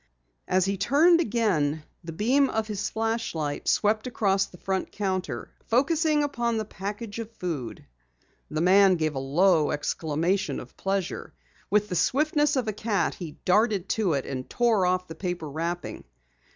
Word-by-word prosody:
As 185 Hz, 0 st, +2 dB
he 195 Hz, 0 st, -1 dB
turned 315 Hz, -, +4 dB
again, 175 Hz, -, 0 dB, 0.2 s
the 165 Hz, -, -6 dB
beam 255 Hz, -, +2 dB
of 220 Hz, 0 st, -1 dB
his 210 Hz, -2 st, -3 dB
flashlight 220 Hz, -10 st, -2 dB
swept 215 Hz, +2 st, +2 dB
across 195 Hz, -5 st, +1 dB
the 180 Hz, -, -15 dB
front 190 Hz, +1 st, -2 dB
counter, 190 Hz, -3 st, -3 dB, 0.2 s
focusing 300 Hz, +4 st, +2 dB
upon 235 Hz, -5 st, -1 dB
the 215 Hz, -, -2 dB
package 205 Hz, +2 st, -6 dB
of 225 Hz, -1 st, -5 dB
food. 165 Hz, -, -5 dB, 0.6 s
The 155 Hz, +1 st, -2 dB
man 190 Hz, +1 st, +6 dB
gave 155 Hz, -2 st, -1 dB
a 135 Hz, -, -3 dB
low 155 Hz, +4 st, +3 dB
exclamation 160 Hz, +5 st, -1 dB
of -, -, -12 dB
pleasure. 195 Hz, -2 st, -3 dB, 0.3 s
With 210 Hz, +1 st, +2 dB
the 180 Hz, -, -3 dB
swiftness 295 Hz, -, +2 dB
of 255 Hz, -4 st, 0 dB
a 215 Hz, -, -1 dB
cat 205 Hz, -3 st, 0 dB
he 165 Hz, -5 st, -8 dB
darted 205 Hz, 0 st, +2 dB
to 205 Hz, -7 st, +1 dB
it 140 Hz, -2 st, -1 dB
and 130 Hz, -1 st, -5 dB
tore 225 Hz, -6 st, +2 dB
off 180 Hz, 0 st, +1 dB
the 160 Hz, -, -7 dB
paper 175 Hz, -1 st, -4 dB
wrapping. 165 Hz, +4 st, -4 dB
195 Hz, 160 wpm, -26 LUFS, 170-225 Hz, 0.6 s, man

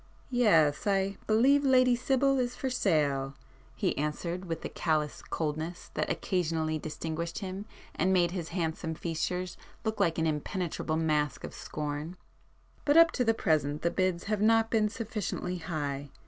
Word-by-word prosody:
"Yes—I 195 Hz, -, +3 dB
believe 265 Hz, +7 st, +4 dB
Lady 255 Hz, -2 st, +5 dB
Sibyl 270 Hz, +2 st, +2 dB
is 250 Hz, 0 st, -1 dB
for 265 Hz, +1 st, -3 dB
sale,"—he 140 Hz, -, -1 dB
answered 170 Hz, +5 st, -2 dB
with 165 Hz, -2 st, -4 dB
the -, -, -3 dB
callous 155 Hz, -3 st, -1 dB
coldness 160 Hz, +2 st, -4 dB
that -, -, -1 dB
occasionally 160 Hz, -3 st, -1 dB
distinguished 160 Hz, +2 st, -4 dB
him 195 Hz, +1 st, -5 dB, 0.3 s
and 185 Hz, -, +1 dB
made 175 Hz, -2 st, +3 dB
his 175 Hz, -3 st, -4 dB
handsome 160 Hz, -2 st, -2 dB
features 180 Hz, +2 st, -3 dB, 0.3 s
look 220 Hz, -1 st, -2 dB
like 165 Hz, -, +2 dB
an 160 Hz, -, +1 dB
impenetrable 160 Hz, +1 st, -2 dB
mask 150 Hz, -2 st, 0 dB
of -, -, -6 dB
scorn—"But 155 Hz, -, -4 dB
up 330 Hz, -1 st, +8 dB
to 250 Hz, -, 0 dB
the 225 Hz, -1 st, +2 dB
present 150 Hz, -6 st, +1 dB
the 170 Hz, -, +2 dB
bids 185 Hz, -2 st, 0 dB
have 210 Hz, -1 st, -1 dB
not 225 Hz, +1 st, +4 dB
been 215 Hz, -2 st, +3 dB
sufficiently 210 Hz, -5 st, -3 dB
high. 145 Hz, -4 st, -3 dB
175 Hz, 145 wpm, -30 LUFS, 155-215 Hz, 0.3 s, up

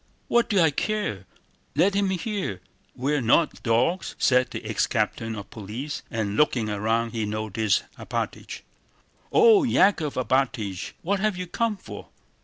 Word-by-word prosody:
"What 235 Hz, 0 st, +3 dB
do 200 Hz, -, +3 dB
I 160 Hz, -3 st, +5 dB
care? 140 Hz, -, -2 dB, 0.5 s
Let 200 Hz, +2 st, +3 dB
him 200 Hz, -1 st, +1 dB
hear! 190 Hz, -, -3 dB, 0.4 s
We're 140 Hz, +3 st, 0 dB
not 125 Hz, +7 st, +2 dB
dogs," 125 Hz, +10 st, +1 dB
said 125 Hz, -1 st, +3 dB
the -, -, -7 dB
ex -, -, 0 dB
captain 115 Hz, 0 st, -1 dB
of 100 Hz, -2 st, -9 dB
police, 115 Hz, +8 st, -6 dB
and 105 Hz, -3 st, -2 dB
looking 120 Hz, -6 st, +2 dB
round 110 Hz, +3 st, 0 dB
he 110 Hz, -2 st, -2 dB
noticed 110 Hz, 0 st, 0 dB, 0.2 s
Alpátych. -, -, -4 dB, 0.7 s
"Oh, 445 Hz, -2 st, +6 dB
Yákov 195 Hz, -, +3 dB
Alpátych! 120 Hz, -7 st, -1 dB
What 200 Hz, +3 st, 0 dB
have 210 Hz, -1 st, 0 dB
you 180 Hz, -, -3 dB
come 220 Hz, +4 st, -1 dB
for?" -, -, -10 dB
130 Hz, 145 wpm, -25 LUFS, -, 0.7 s, Oh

